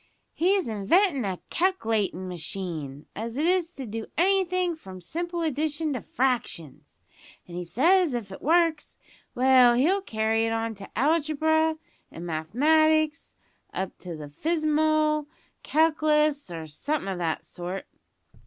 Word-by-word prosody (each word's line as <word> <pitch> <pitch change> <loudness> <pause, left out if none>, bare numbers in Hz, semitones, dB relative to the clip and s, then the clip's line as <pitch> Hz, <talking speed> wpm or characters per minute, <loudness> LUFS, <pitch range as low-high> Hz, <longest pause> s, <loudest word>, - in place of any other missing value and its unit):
"He's 375 +1 +2
inventin' 260 - +2
a 185 -2 -3
calc'latin' 225 - 0
machine, 165 -5 -5
as 230 +3 -5
is 340 +2 +2
to 270 - -7
do 225 0 -5
anythin' 365 -1 +2
from 190 -12 -11
simple 340 - -4
addition 310 0 -1
to 250 - -3
fractions, 240 - -2 0.5
an' 175 - -11
he 180 +1 -4
says 320 - +3
if 215 -5 -5
it 190 - -9
works 330 0 +1 0.4
well 255 -1 +6
he'll 345 +11 +3
carry 225 - 0
it 225 - -1
on 225 0 -2
to 195 -2 -11
algebra 315 +2 +2 0.3
an' 165 - -9
mathematics, 310 - +2 0.4
up 190 0 -3
to 175 -2 -7
the 150 -1 -8
fizmal 310 - +1 0.4
calc'lus, 305 - +2
or 165 -2 -6
somethin' 195 - -3
o' 190 - -3
that 165 -2 -2
sort. 180 +2 -6
275 Hz, 130 wpm, -26 LUFS, 195-315 Hz, 0.5 s, well